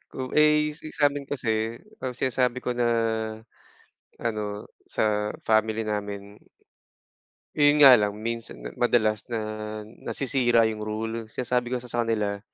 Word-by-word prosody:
Kung 130 -1 -5
ay 150 0 +4
since 155 - -10
samin 145 -1 +2
kasi, 115 -4 -1 0.2
kapag 125 -1 -5
sinasabi 125 -1 +1
ko - - -2
na 120 -1 +2 1.3
ano, 105 -2 -3 0.2
sa 105 -1 0 0.2
family 110 0 +2
namin 100 0 -4 1.2
yon 145 0 +6
nga 135 - +11
lang 105 0 -1
minsan, 115 - -5 0.2
madalas 110 -4 +2
na 115 -2 -2 0.5
nasisira 120 +1 +1
'yung 110 -1 -1
rule, 110 +1 -4
sinasabi 125 +1 -1
ko 125 - -1
kasi 125 - -6
sa 120 0 -1
kanila, 105 -3 -1
115 Hz, 130 wpm, -26 LUFS, 105-125 Hz, 1.3 s, nga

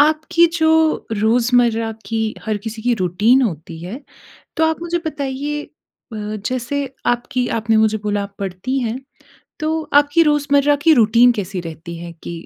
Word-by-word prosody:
आपकी 310 +3 +4
जो 320 - +3 0.5
रोज़मर्रा 230 +1 +2 0.2
की 225 +2 -2 0.3
हर 215 -1 -1
किसी 220 0 -5
की 245 +1 +2
रूटीन 210 +9 +3
होती 160 -6 -4
है, 210 +9 -6 0.6
तो 320 - +3
आप 320 +1 -1
मुझे 345 0 -1
बताइए 290 0 -3 0.5
अ, - - -5 0.3
जैसे 255 +4 -2 0.2
आपकी 245 +1 0
आपने 225 0 +1
मुझे 220 0 +3
बोला 205 -1 -1
आप 200 - -9
पढ़ती 200 +8 -3
हैं, 235 -1 -2 0.6
तो 315 +1 -1
आपकी 290 +3 +5
रोज़मर्रा 290 -1 +3
की 325 - +7
रूटीन 235 +1 +5
कैसी 195 -4 -4
रहती 170 0 -8
है? 170 0 -8
कि 170 +1 -9
240 Hz, 155 wpm, -19 LUFS, 210-285 Hz, 0.6 s, की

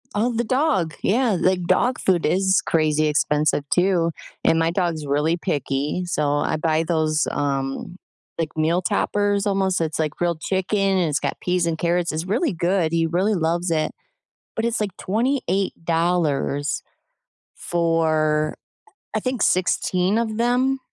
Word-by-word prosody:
Oh, 235 +4 +1
the 235 +1 0
dog. 230 - +1
Yeah. 230 -1 +2
Like, 180 -1 +1
dog 250 +8 +2
food 180 -3 +1
is 190 +2 +2
crazy 155 -1 +2
expensive 150 -1 +1
too. 175 -2 +2 0.3
And 165 - +3
my 165 0 +2
dog's 170 -5 -1
really 150 +4 +1
picky, 145 +3 -2
so 150 -4 0
I 150 - 0
buy 160 +1 +1
those, 155 -2 0
um, 140 +4 -2 0.4
like, 160 -2 -3
meal 165 +3 +1
toppers 205 +2 0
almost. 190 -3 +1
It's 160 -1 -2
like 155 -2 0
grilled 170 -2 -2
chicken 190 +2 -1
and 190 -4 +2
it's 145 - 0
got - - -3
peas 180 -1 +1
and 165 -1 -1
carrots. 175 0 0
It's 160 +3 -3
really 235 - 0
good. 175 -1 0
He 165 -1 +1
really 185 +6 +1
loves 170 +1 0
it, 155 -1 0 0.7
but 225 - -1
it's 235 -1 0
like 200 -3 -3
$28 175 - 0 0.7
for, 155 -3 0 0.6
I - - +2
think, 255 +1 -3
16 185 +2 +1
of 220 -2 -1
them. 250 +3 +1
175 Hz, 150 wpm, -22 LUFS, 155-195 Hz, 0.7 s, And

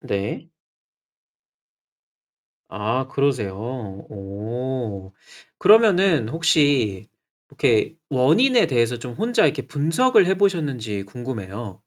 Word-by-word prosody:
네. 100 0 -4 2.2
아 110 +7 -2
그러세요. 130 -9 -1 0.6
어 105 0 -6 0.5
그러면은 195 - +4
혹시 145 - +1 0.4
이렇게 115 +7 +1
원인에 165 - +3
대해서 120 -4 0
좀 120 +1 -8
혼자 225 - +1
이렇게 135 -4 0
분석을 180 - +2
해 190 +1 +1
보셨는지 140 - -1
궁금해요. 105 -3 -8
130 Hz, 200 characters per minute, -22 LUFS, 105-165 Hz, 2.2 s, 그러면은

